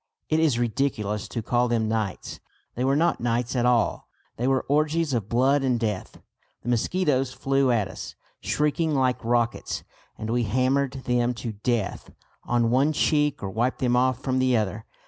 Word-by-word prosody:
It 155 - +2
is 155 -7 +3
ridiculous 110 -4 -1
to 115 - -4
call 120 +3 +1
them 115 -2 0
nights. 110 -3 -3 0.3
They 125 - -2
were 135 +1 +2
not 170 +3 +2
nights 120 +2 -1
at 125 -1 +2
all; 120 -3 +1 0.3
they 125 - -1
were 135 -1 +1
orgies 155 +1 +1
of 110 -4 -2
blood 135 +4 +3
and 125 -3 +1
death. 105 -5 -3 0.4
The - - -4
mosquitoes 135 +1 +1
flew 135 0 +1
at 110 -5 +2
us, 95 - -8 0.2
shrieking 150 +1 0
like 130 -2 +1
rockets; 120 0 -1 0.3
and 110 +1 -4
we 120 +1 +1
hammered 130 +4 +1
them 125 0 +1
to 115 -1 -5
death 110 0 -2 0.3
on 120 -1 +1
one 140 +5 +3
cheek 150 -3 +1
or 95 - -3
wiped 120 +5 0
them 125 -1 +1
off 130 0 +2
from 130 -1 0
the 130 -2 +3
other. 105 +1 -2
125 Hz, 175 wpm, -25 LUFS, 115-135 Hz, 0.4 s, is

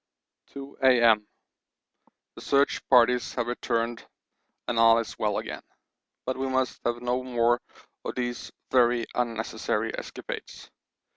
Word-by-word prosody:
2 140 0 -10
A.M. 115 -5 +5 1.1
The - - -12
search 140 0 +2
parties 125 -1 +4
have 120 - 0
returned 120 -1 -2 0.6
and 120 -2 0
all 115 0 +7
is 115 - -4
well 105 -1 0
again, - - -5 0.6
but 130 0 -2
we 135 0 -2
must 130 -1 -1
have 120 0 -1
no 125 +1 0
more 120 -1 +1 0.4
of - - -5
these 120 -1 -4 0.2
very 120 -2 +3
unnecessary 115 -2 -2
escapades. - - -8
120 Hz, 125 wpm, -27 LUFS, 115-130 Hz, 1.1 s, all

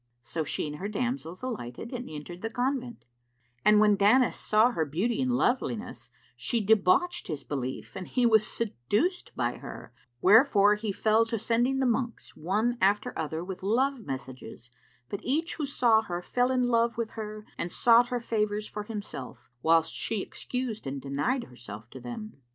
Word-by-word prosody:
So 160 +6 -2
she 150 - -2
and 150 0 -5
her 195 - -4
damsels 215 -4 -3
alighted 230 - -5
and 245 0 -5
entered 155 +4 -8
the 225 - -2
convent; 250 -1 -2 0.6
and 210 0 +6
when 210 -1 +5
Danis 220 +6 +4
saw 220 +3 +3
her 165 -9 0
beauty 190 - -1
and 255 -1 +1
loveliness, 245 -3 -1 0.3
she 235 - -1
debauched 220 - +3
his 155 -5 -4
belief 130 -3 -5
and 185 - -6
he 250 -2 +1
was 220 -2 +5
seduced 225 - -1
by - - -1
her: - - -9 0.3
wherefore 210 - +6
he 210 0 -2
fell 220 +3 +3
to 230 0 -2
sending 240 +5 +1
the 265 - +1
monks, 240 0 -2
one 215 +9 0
after 200 +2 +2
other 160 +1 -3
with 185 0 -7
love 255 +7 +1
messages; 130 - -7 0.4
but 200 - -4
each 315 +6 -1
who 300 -3 -2
saw 235 -5 +4
her 175 -4 -5
fell 245 +5 +1
in 255 -1 +2
love 235 -1 +2
with 230 -2 -2
her 215 -1 -7
and 170 - -4
sought 240 0 +5
her 245 -1 -2
favours 215 -2 -1
for 210 - -5
himself, 200 - -7
whilst 165 +1 +3
she 215 -4 -2
excused 250 - -4
and 135 +1 -3
denied 145 - -1
herself 115 -3 -10
to 130 - -9
them. 125 - -7
215 Hz, 175 wpm, -28 LUFS, 170-245 Hz, 0.6 s, and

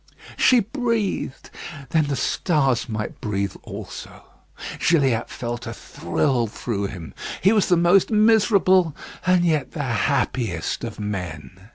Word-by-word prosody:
She 250 -2 +5
breathed! 230 - -2 0.4
then 155 -3 +2
the 140 - -1
stars 135 -3 +1
might 105 -1 -5
breathe 100 -2 -2
also. - - -9 0.6
Gilliatt 135 -8 +2
felt 120 0 -5
a - - -4
thrill 125 -5 -1
through 100 -2 -3
him. 90 -5 -9 0.3
He 195 +4 +4
was 210 -3 +3
the 175 - +4
most 175 +3 +4
miserable 205 -6 +4 0.3
and 180 -1 +4
yet 155 -6 0
the 150 - -3
happiest 120 - -1
of 115 -2 -6
men. 95 -2 -6
140 Hz, 130 wpm, -23 LUFS, 110-185 Hz, 0.6 s, She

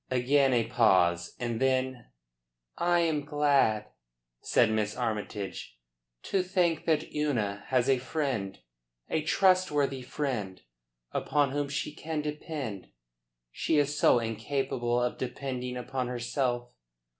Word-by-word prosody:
Again 135 +2 +3
a 120 -2 +2
pause, 90 -7 +3
and 120 -2 -2
then: 130 -2 0 0.7
"I 175 0 +2
am 155 -3 +1
glad," 140 -7 +2 0.6
said - - +3
Miss 105 0 -1
Armytage, 105 - -4 0.5
"to 195 - +1
think 180 -3 0
that 155 -1 +1
Una 115 -10 -1
has 130 -1 +2
a 135 -2 +3
friend, 130 -8 -2 0.5
a 160 - +1
trustworthy 150 -6 +2
friend, 125 -8 -4 0.5
upon 145 -2 +1
whom 145 0 -1
she 145 +1 -3
can 155 0 -4
depend. 150 - -5 0.6
She 160 - 0
is 145 0 +2
so 135 - +5
incapable 120 +1 -1
of 125 0 -1
depending 125 -1 -4
upon 125 0 -3
herself. 120 0 -2
130 Hz, 120 wpm, -29 LUFS, 120-145 Hz, 0.7 s, so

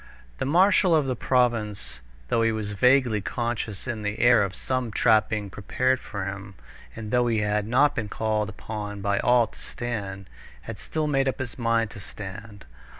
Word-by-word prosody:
The - - -1
marshal 180 +3 +4
of 150 -3 +3
the 130 -1 -1
province, 115 -5 0 0.3
though 115 - +2
he 115 0 +3
was 110 -2 -3
vaguely 125 0 +3
conscious 115 -2 -3
in 120 -4 -4
the 105 +1 -3
air 120 0 +5
of 95 -2 -1
some 130 -2 -2
trap 110 0 +3
being 105 -3 -3
prepared 130 +7 0
for 100 -6 -5
him, 100 0 -7 0.4
and 110 -2 -6
though 125 -1 +3
he 115 -2 +1
had 105 0 0
not 140 +5 +4
been 110 -3 -3
called 110 -1 -1
upon 105 0 -6
by 100 +1 +1
all 125 -1 +4
to - - -17
stand, 100 -5 -5 0.3
had - - -8
still 155 -1 -2
made 135 -2 +1
up 130 - -1
his 125 -2 -6
mind 115 -2 +1
to 105 - -10
stand. 100 +1 -9
110 Hz, 185 wpm, -25 LUFS, 105-125 Hz, 0.4 s, air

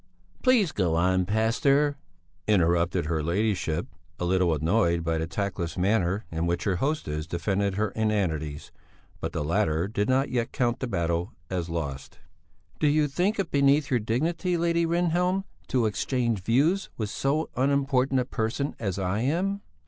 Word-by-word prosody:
"Please 240 - +4
go 85 -5 0
on, 90 +1 +2
pastor," 135 +7 +2 0.5
interrupted 85 -3 +2
her 80 0 -1
ladyship, 85 -1 0 0.3
a 90 - -1
little 90 -1 +2
annoyed 85 +2 +1
by 80 0 0
the 80 - -2
tactless 90 -3 -3
manner 95 +1 +1
in 80 +1 -1
which 85 0 -1
her 95 -4 0
hostess 85 - -2
defended 95 +3 -1
her 105 +1 0
inanities; 85 -9 -1 0.5
but - - -3
the - - -2
latter 85 0 +1
did 105 +1 -1
not 135 +2 +2
yet 120 -2 -1
count 120 -3 0
the 130 - -2
battle 85 -3 -1 0.2
as 90 -2 -2
lost. 75 -5 -5 0.6
"Do 150 - +3
you 150 0 +3
think 180 +9 0
it 195 -4 -2
beneath 140 +1 +3
your 125 - +3
dignity, 165 - 0
Lady 170 0 +1
Rehnhjelm, 180 +3 +1 0.2
to 125 -3 +1
exchange 115 0 0
views 145 - +2
with 105 -3 -3
so 150 +4 -1
unimportant 135 -1 +2
a - - -3
person 125 +4 -2
as 100 -5 -2
I 95 +2 -1
am...?" 180 - 0
110 Hz, 155 wpm, -27 LUFS, 85-140 Hz, 0.6 s, Please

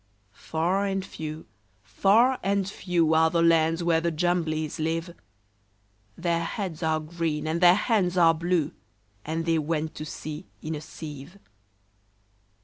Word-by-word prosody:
Far 175 - -1
and 195 -1 -2
few, 155 -2 -7 0.4
far 230 - +3
and 195 -1 0
few, 175 -5 0
Are 160 0 +5
the 170 0 +1
lands 165 0 +3
where 165 -1 +2
the 170 - +1
Jumblies 160 -2 -1
live: 165 +2 -2 1.0
Their 170 -1 0
heads 180 -3 -4
are 160 -1 +1
green, 155 -1 -3
and 165 +2 -1
their 175 0 +7
hands 195 -4 +1
are 165 -2 +6
blue; 165 -1 0 0.5
And 160 +1 -3
they 165 -1 +2
went 155 +1 -2
to 155 - -5
sea 155 +3 -7
in 155 - -5
a 150 - -5
sieve. 150 +2 -9
165 Hz, 140 wpm, -26 LUFS, 155-180 Hz, 1.0 s, their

